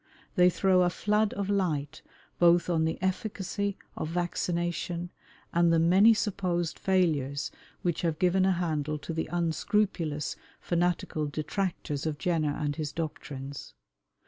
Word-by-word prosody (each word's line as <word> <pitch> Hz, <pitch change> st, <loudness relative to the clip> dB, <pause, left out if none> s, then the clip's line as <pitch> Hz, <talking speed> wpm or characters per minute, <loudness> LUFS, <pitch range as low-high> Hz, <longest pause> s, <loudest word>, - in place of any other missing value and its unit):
They 180 Hz, -2 st, +6 dB
throw 185 Hz, 0 st, +3 dB
a 180 Hz, -, +4 dB
flood 210 Hz, +3 st, +1 dB
of 200 Hz, -1 st, -2 dB
light 155 Hz, -7 st, -1 dB, 0.4 s
both 175 Hz, 0 st, +5 dB
on 160 Hz, -1 st, +2 dB
the 160 Hz, -, -1 dB
efficacy 200 Hz, +1 st, -2 dB, 0.2 s
of 155 Hz, -, -3 dB
vaccination 175 Hz, 0 st, -2 dB, 0.4 s
and 170 Hz, 0 st, +4 dB
the 165 Hz, -, +4 dB
many 190 Hz, +7 st, +6 dB
supposed 180 Hz, -5 st, -1 dB
failures 155 Hz, -7 st, +1 dB, 0.3 s
which 175 Hz, -2 st, 0 dB
have 165 Hz, -3 st, 0 dB
given 185 Hz, +1 st, +3 dB
a 190 Hz, 0 st, +4 dB
handle 155 Hz, -4 st, -1 dB
to 160 Hz, +3 st, -6 dB
the 160 Hz, -, -2 dB
unscrupulous 170 Hz, -2 st, 0 dB, 0.2 s
fanatical 170 Hz, -3 st, 0 dB
detractors 155 Hz, -1 st, -2 dB
of 150 Hz, -2 st, -2 dB
Jenner 155 Hz, -3 st, 0 dB
and 145 Hz, -1 st, -2 dB
his 150 Hz, -2 st, -3 dB
doctrines. 140 Hz, -3 st, -6 dB
170 Hz, 135 wpm, -29 LUFS, 155-185 Hz, 0.4 s, They